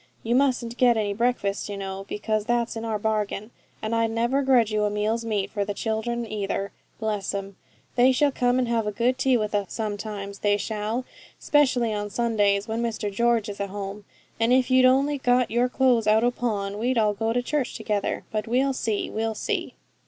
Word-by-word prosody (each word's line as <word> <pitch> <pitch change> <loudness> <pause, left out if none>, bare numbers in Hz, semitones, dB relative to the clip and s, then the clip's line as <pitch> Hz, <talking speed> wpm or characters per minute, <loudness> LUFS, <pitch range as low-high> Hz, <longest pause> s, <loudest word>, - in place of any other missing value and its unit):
You 230 - 0
mustn't 250 -3 +1
get 245 -2 +5
any 205 -2 0
breakfast, 210 -3 -1
you 200 - -4
know, 195 0 -5
because 215 0 -1
that's 235 0 0
in 225 - -5
our 220 -1 -1
bargain; 215 0 -2 0.3
and 215 +1 -2
I'd 230 0 +2
never 235 +5 +1
grudge 250 -5 +3
you 215 0 +1
a - - +1
meal's 215 +3 -1
meat 210 -4 -2
for 205 -2 -1
the 200 0 -4
children 230 +2 -2
either, 200 -2 -3 0.3
bless 210 -3 -2
'em! 195 0 -5 0.4
They 250 +1 +5
shall 285 +2 +3
come 245 -1 +1
and 255 -1 +1
have 230 -2 0
a - - 0
good 245 +5 0
tea 260 -2 +3
with 215 -1 -2
us 205 -2 -1
sometimes, 205 -2 -4
they 205 0 +2
shall 220 +4 -3 0.3
specially 255 -6 +2
on 205 0 -3
Sundays, 205 -3 +1
when 225 +1 -2
Mr 220 -3 -2
George 235 0 +2
is 205 -1 -7
at 200 - -2
home; 200 +1 -6 0.3
and 230 +1 +2
if 255 0 +3
you'd 255 0 +6
only 275 +3 +3
got 250 -2 +2
your 240 +2 +2
clothes 250 -4 +2
out 215 +1 +4
o' 245 - +3
pawn, 205 -5 -2
we'd 245 +2 0
all 215 -2 +3
go 225 +2 -1
to 245 +1 0
church 290 0 -1
together. 205 -2 -2
But 215 0 -2
we'll 265 +4 +2
see, 220 -5 -1
we'll 225 0 -2
see.' - - -3
225 Hz, 205 wpm, -25 LUFS, 205-245 Hz, 0.4 s, you'd